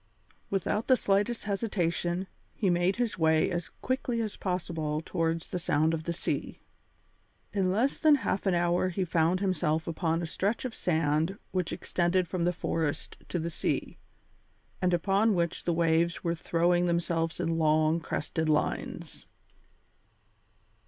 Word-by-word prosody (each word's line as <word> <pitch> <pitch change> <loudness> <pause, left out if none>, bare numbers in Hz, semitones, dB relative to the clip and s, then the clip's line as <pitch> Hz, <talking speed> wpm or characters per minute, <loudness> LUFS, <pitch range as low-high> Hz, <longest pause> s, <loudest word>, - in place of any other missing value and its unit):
Without 200 +3 -1
the 255 - +5
slightest 205 +4 +1
hesitation, 185 -4 -1 0.3
he 195 -5 +1
made 175 +2 +2
his 235 -5 -1
way 160 -1 +3
as 175 -1 -3
quickly 255 -2 -2
as 220 -3 -2
possible 165 -5 -2
towards 165 0 -1
the 180 - -2
sound 160 0 +2
of 160 -1 -3
the 170 - -1
sea. 170 - -3 0.9
In 190 -3 +1
less 235 +8 +1
than 310 -2 +6
half 200 -8 -1
an 185 - +3
hour 175 +1 +2
he 185 +1 -1
found 170 +2 +2
himself 165 -5 0
upon 165 0 0
a 170 - -2
stretch 200 +9 -1
of 250 - -3
sand 160 +1 0
which 180 -2 -1
extended 175 +1 0
from 170 0 -1
the 175 - +3
forest 160 -3 -2
to - - -1
the 170 0 -2
sea, - - -2 0.8
and 180 -1 +2
upon 195 +5 +2
which 170 -1 -1
the 175 - +2
waves 170 +1 +2
were 170 -1 +1
throwing 175 +1 +1
themselves 170 -1 0
in 165 0 0
long, 155 +1 +3
crested 160 0 -2
lines. 150 -1 -2
175 Hz, 150 wpm, -29 LUFS, 165-190 Hz, 0.9 s, than